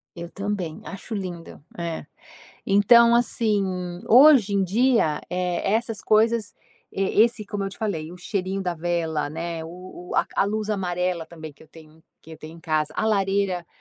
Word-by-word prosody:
Eu 170 Hz, -1 st, -7 dB
também 195 Hz, -5 st, -4 dB
acho 200 Hz, +5 st, -8 dB
lindo, 180 Hz, -7 st, -7 dB
é. 170 Hz, -1 st, -4 dB, 0.6 s
Então 235 Hz, +4 st, +6 dB
assim, 225 Hz, -3 st, +1 dB, 0.4 s
hoje 255 Hz, -4 st, +7 dB
em 195 Hz, -, +2 dB
dia, 215 Hz, -, +2 dB
eh, 180 Hz, +2 st, -1 dB
essas 225 Hz, -2 st, -1 dB
coisas, 220 Hz, -1 st, +2 dB, 0.4 s
e 195 Hz, -, -2 dB, 0.2 s
esse 235 Hz, -2 st, 0 dB
como 200 Hz, -1 st, -3 dB
eu -, -, -2 dB
te -, -, -11 dB
falei 175 Hz, -7 st, -3 dB
o -, -, -10 dB
cheirinho 190 Hz, 0 st, -3 dB
da 180 Hz, -2 st, -2 dB
vela, 165 Hz, -2 st, -2 dB
né, 165 Hz, +1 st, -5 dB
o 180 Hz, +3 st, -11 dB
o -, -, -5 dB
a -, -, +3 dB
ca -, -, -3 dB
a -, -, +1 dB
luz 215 Hz, +1 st, -2 dB
amarela 180 Hz, -3 st, -2 dB
também 160 Hz, -2 st, -10 dB
que 140 Hz, -, -20 dB
eu 160 Hz, -, -19 dB
tenho 160 Hz, 0 st, -17 dB, 0.2 s
que 160 Hz, -, -14 dB
eu -, -, -11 dB
tenho 155 Hz, +2 st, -11 dB
em 165 Hz, -, -15 dB
casa, 155 Hz, -2 st, -1 dB
a -, -, 0 dB
lareira 195 Hz, -4 st, 0 dB
185 Hz, 185 wpm, -24 LUFS, 165-210 Hz, 0.6 s, hoje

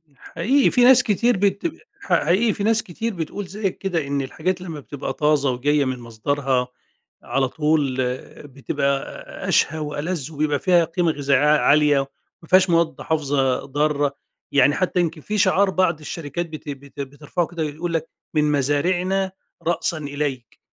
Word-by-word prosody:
حقيقي 240 Hz, -, +1 dB
في 250 Hz, -, +4 dB
ناس 250 Hz, 0 st, +7 dB
كتير 235 Hz, 0 st, +2 dB
بت 200 Hz, -, +1 dB, 0.3 s
ح -, -, -2 dB
حقيقي 200 Hz, +7 st, +3 dB
فيه 200 Hz, -, -4 dB
ناس 220 Hz, +1 st, +3 dB
كتير 225 Hz, +6 st, -4 dB
بتقول 180 Hz, +3 st, -5 dB
زيك 195 Hz, 0 st, -3 dB
كده، 170 Hz, -7 st, -2 dB
إن 140 Hz, 0 st, -1 dB
الحاجات 175 Hz, +7 st, -2 dB
لما 165 Hz, -5 st, -6 dB
بتبقى 140 Hz, -1 st, -6 dB
طازة 150 Hz, -1 st, +2 dB
وجاية 145 Hz, +3 st, +1 dB
من 130 Hz, -1 st, -3 dB
مصدرها 125 Hz, +2 st, -1 dB, 0.6 s
على 135 Hz, -1 st, 0 dB
طول 150 Hz, -2 st, 0 dB
آآ 125 Hz, +3 st, -5 dB
بتبقى 140 Hz, 0 st, -3 dB, 0.2 s
أشهى 155 Hz, +1 st, +2 dB
وألذ، 150 Hz, +1 st, -3 dB
وبيبقى 150 Hz, -1 st, 0 dB
فيها 175 Hz, -3 st, +4 dB
قيمة 170 Hz, 0 st, 0 dB
غذائية 140 Hz, -3 st, +1 dB
ع-عالية، 150 Hz, -1 st, +4 dB, 0.4 s
ما 165 Hz, -, -15 dB
فيهاش 185 Hz, 0 st, +5 dB
مواد 170 Hz, -1 st, +1 dB
حافظة 140 Hz, -5 st, 0 dB
ضارة، 145 Hz, 0 st, 0 dB, 0.4 s
يعني 145 Hz, +1 st, +4 dB
حتى 185 Hz, 0 st, 0 dB
يمكن 165 Hz, -3 st, -1 dB
في 210 Hz, +7 st, -3 dB
شعار 200 Hz, 0 st, +3 dB
بعض 185 Hz, -4 st, +1 dB
الشركات 155 Hz, +2 st, -4 dB
بت 155 Hz, -1 st, -8 dB
بت 140 Hz, 0 st, -9 dB
بترفعه 145 Hz, +5 st, -3 dB
كده 170 Hz, -2 st, -4 dB
يقول 160 Hz, +3 st, -4 dB
لك:" 165 Hz, -1 st, -2 dB, 0.2 s
من 150 Hz, -1 st, +2 dB
مزارعنا 180 Hz, +7 st, +1 dB, 0.4 s
رأسًا 170 Hz, -1 st, +1 dB
إليك." 145 Hz, -5 st, -4 dB
155 Hz, 155 wpm, -22 LUFS, 140-180 Hz, 0.6 s, ناس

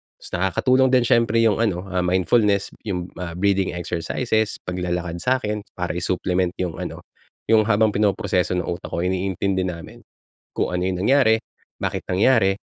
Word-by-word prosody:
tapos -, -, -14 dB
nakakatulong 130 Hz, +8 st, +3 dB
din 125 Hz, -, +4 dB
siyempre 115 Hz, -1 st, +3 dB
yung 110 Hz, -3 st, +3 dB
ano, 100 Hz, -6 st, 0 dB
ah, 90 Hz, 0 st, 0 dB
mindfulness, 100 Hz, +3 st, +2 dB, 0.2 s
yung, 90 Hz, -2 st, -3 dB
ah, 85 Hz, -2 st, -5 dB
breathing 95 Hz, -1 st, +1 dB
exercises, 110 Hz, +6 st, -1 dB
paglalakad 90 Hz, -1 st, -3 dB
sa 130 Hz, +7 st, +2 dB
akin 105 Hz, -4 st, -3 dB, 0.2 s
para 90 Hz, -1 st, -2 dB
i-supplement 90 Hz, +1 st, -1 dB
yung 90 Hz, -4 st, -3 dB
ano, -, -, -6 dB, 0.4 s
yung 110 Hz, -1 st, +4 dB
habang 110 Hz, 0 st, +4 dB
pinoproseso 95 Hz, -3 st, +1 dB
ng 90 Hz, -, -1 dB
utak 85 Hz, -, -5 dB
ko, 85 Hz, -, -2 dB
iniintindi 95 Hz, +1 st, -1 dB
namin 85 Hz, -2 st, -8 dB, 0.5 s
kung -, -, -1 dB
ano 90 Hz, -, 0 dB
yung 95 Hz, -1 st, -1 dB
nangyari, 130 Hz, -5 st, +4 dB, 0.4 s
bakit -, -, -2 dB
nangyari, 95 Hz, 0 st, +3 dB
95 Hz, 155 wpm, -22 LUFS, 90-110 Hz, 0.5 s, din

